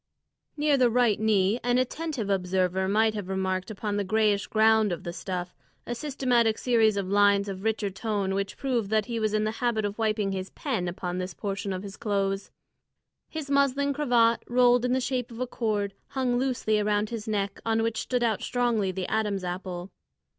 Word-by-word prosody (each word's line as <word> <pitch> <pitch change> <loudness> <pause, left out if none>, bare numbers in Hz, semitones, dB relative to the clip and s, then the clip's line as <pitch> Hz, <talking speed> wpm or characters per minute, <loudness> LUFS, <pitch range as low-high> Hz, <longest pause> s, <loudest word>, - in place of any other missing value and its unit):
Near 295 -1 +3
the 250 -2 +4
right 235 -3 +2
knee 215 0 +2
an 245 0 +2
attentive 255 -2 -2
observer 190 -1 0
might 215 +2 +3
have 205 -4 -5
remarked 190 0 -1
upon 205 -1 -3
the 205 - 0
greyish 210 0 +1
ground 220 -1 +4
of 175 - -4
the 170 - -5
stuff 180 -1 -4 0.3
a 240 - -3
systematic 245 -4 +1
series 225 -4 +3
of 195 -2 -1
lines 200 0 +4
of 190 -1 -5
richer 220 -2 0
tone 200 -2 -2
which 195 0 -3
proved 245 -7 -1
that 215 -1 +2
he 235 -2 -3
was 215 -1 0
in 215 - +1
the 215 - 0
habit 235 -3 +1
of 205 +2 -4
wiping 215 -2 0
his 190 0 -4
pen 230 - -3
upon 180 +1 -4
this 185 -1 -5
portion 200 -1 -3
of 185 0 -4
his 200 0 -8
clothes. 195 -2 -1 0.8
His 305 -3 -5
muslin 280 0 +2
cravat, 240 -5 +3
rolled 245 0 +4
in 250 - +1
the 260 - +2
shape 250 -1 -2
of 230 -1 -10
a 255 - 0
cord, 210 -5 -2
hung 250 -2 0
loosely 245 -5 +1
around 210 +1 0
his 225 -1 -5
neck, 200 -2 -2
on 225 0 +1
which 225 -1 -1
stood 250 -1 -1
out 225 -3 +1
strongly 235 -6 0
the 185 0 -4
Adam's 210 -3 -1
apple. 180 0 -5
215 Hz, 195 wpm, -27 LUFS, 195-240 Hz, 0.8 s, the